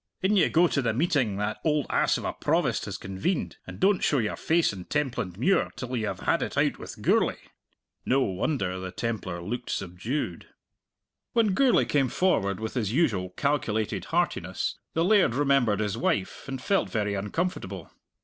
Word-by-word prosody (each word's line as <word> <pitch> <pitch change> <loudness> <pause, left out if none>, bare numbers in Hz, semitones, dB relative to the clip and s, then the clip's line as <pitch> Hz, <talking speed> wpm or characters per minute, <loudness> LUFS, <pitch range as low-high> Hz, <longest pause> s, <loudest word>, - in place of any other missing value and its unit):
In 200 +3 +3
you 190 - +4
go 175 +2 +4
to 140 - 0
the 115 -3 0
meeting 140 - +1
that 105 +1 -2
oald 150 -2 +1
ass - - +2
of - - -6
a - - -1
Provost - - 0
has - - -5
convened, 95 - -2
and - - -8
don't 195 0 +3
show 145 - +3
your 110 -4 0
face 165 -7 +2
in 90 -2 -8
Templandmuir 130 - 0
till 125 0 -4
you 110 -3 -1
have - - -4
had - - +1
it - - -3
out - - +2
with - - -9
Gourlay!" - - +3 0.7
No 135 +2 +2
wonder 95 -2 -1
the 95 0 -5
Templar 95 -7 -3
looked 120 +6 -4
subdued. 95 - -3 0.9
When 225 -4 +3
Gourlay 260 +4 +4
came 135 -3 +1
forward 100 - +1
with 110 0 -4
his 110 -6 -1
usual 115 - +1
calculated 115 -7 0
heartiness, - - -1 0.2
the 165 +1 +2
laird 195 - +4
remembered 135 -7 +2
his 105 +1 -2
wife 100 -5 -1
and 135 -1 -4
felt 195 +9 +1
very 105 -3 -1
uncomfortable. 100 - -3
125 Hz, 175 wpm, -27 LUFS, 100-155 Hz, 0.9 s, you